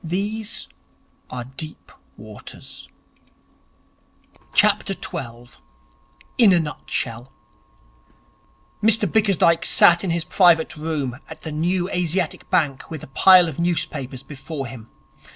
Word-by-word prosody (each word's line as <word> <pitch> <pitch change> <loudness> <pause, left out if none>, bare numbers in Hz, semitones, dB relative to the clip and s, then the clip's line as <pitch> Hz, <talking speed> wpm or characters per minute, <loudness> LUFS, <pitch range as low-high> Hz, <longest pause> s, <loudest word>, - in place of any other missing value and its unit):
These 205 +6 -3 0.6
are 125 -1 -5
deep 135 +5 -8 0.3
waters.' 105 0 -11 1.7
12. 120 +1 -1 0.8
In 215 -6 +7
a 175 - +4
Nutshell 130 -5 -4 1.5
Mr 220 0 +4
Bickersdyke 175 -4 +2
sat 175 +1 +6
in 190 - -2
his 170 0 0
private 170 -1 +3
room 150 -5 -3
at - - -11
the 160 - -5
New 175 +4 -1
Asiatic 180 -2 -2
Bank 140 -5 0
with 160 -4 -7
a - - -9
pile 185 +1 +7
of 160 -2 -6
newspapers 135 -6 -2
before 140 +1 -7
him. 120 -3 -10
160 Hz, 105 wpm, -22 LUFS, 135-180 Hz, 1.7 s, In